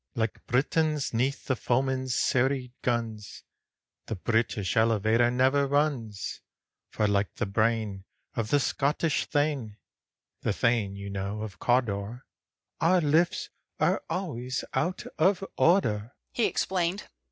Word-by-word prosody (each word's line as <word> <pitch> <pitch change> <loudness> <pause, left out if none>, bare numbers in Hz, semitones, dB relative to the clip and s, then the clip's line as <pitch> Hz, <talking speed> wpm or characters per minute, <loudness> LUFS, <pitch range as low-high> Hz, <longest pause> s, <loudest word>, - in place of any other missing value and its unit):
"Like 115 -2 -2
Britons 150 +3 +1
'neath 130 +5 0
the 130 - +1
foeman's 130 +1 0
serried 130 -1 +1
guns, 115 -4 -3 0.6
The 110 - -2
British 110 0 0
elevator 110 +1 +3
never 130 +3 +3
runs, 135 - -1 0.5
For 105 - 0
like 100 -1 0
the 120 - -1
brain 105 -1 0 0.3
of 110 -2 -2
the 145 - +4
Scottish 145 +4 0
Thane, 145 -8 -1 0.6
The - - 0
Thane, 115 -5 +1
you 100 0 -6
know, 100 +2 -3
of 105 -4 -8
Cawdor, 120 -1 0 0.5
Our 180 +3 +4
lifts 160 +3 +2 0.3
are - - +2
always 130 -8 -3
out 180 +2 -1 0.2
of 195 0 +3
order," 115 - +2 0.2
he 235 - +1
explained. 185 +1 -1
120 Hz, 120 wpm, -28 LUFS, 110-145 Hz, 0.6 s, the